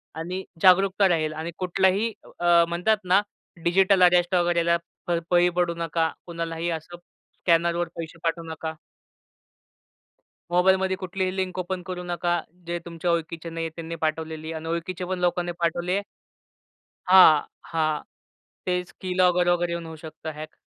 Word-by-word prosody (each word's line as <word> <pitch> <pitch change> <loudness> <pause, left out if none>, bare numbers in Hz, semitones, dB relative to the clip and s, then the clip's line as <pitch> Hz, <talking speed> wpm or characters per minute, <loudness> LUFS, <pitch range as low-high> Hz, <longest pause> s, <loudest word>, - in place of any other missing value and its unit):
आणि 180 +4 -4 0.2
जागरूकता 195 +1 +5
राहील. 155 -3 +1
आणि 160 +2 -5
कुठलाही 190 +4 +1 0.3
अ, 175 -1 +5
म्हणतात 180 +6 +2
ना 185 +2 +4 0.4
डिजिटल 190 +2 +4
अरेस्ट 180 +1 +4
वगैरेला, 170 -1 +2 0.3
प 175 -1 +1
बळी 175 0 +5
पडू 175 -1 +2
नका. 165 -1 0 0.2
कुणालाही 165 0 -3
असं 165 +1 -5
स्कॅनरवर 170 0 -1
पैसे 165 0 -7
पाठवू 170 0 -1
नका. 160 0 -5 1.8
मोबाईलमध्ये 190 +1 +3
कुठलीही 185 0 -3
लिंक 185 -1 -2
ओपन 185 0 -3
करू 180 -1 -5
नका. 175 -1 -1 0.3
जे 175 0 -2
तुमच्या 170 +1 -2
ओळखीचे 165 0 -3
नाही 165 0 -4
आहे - - -3
त्यांनी 165 0 -6
पाठवलेली 160 0 -3
आणि 160 0 -6
ओळखीचे 170 +2 -3
पण 185 0 -3
लोकांनी 175 0 0
पाठवली 175 +1 0
आहे 200 - +1 1.1
हां, 180 -5 +7 0.3
हां. 155 -2 +1 0.7
तेच 180 0 -1
की-लॉगर 180 -1 +2
वगैरे 175 0 +1
येऊन 170 -1 -4
होऊ 160 - -8
शकतं 160 0 -7
हॅक. 155 +1 -9
175 Hz, 140 wpm, -25 LUFS, 165-180 Hz, 1.8 s, हां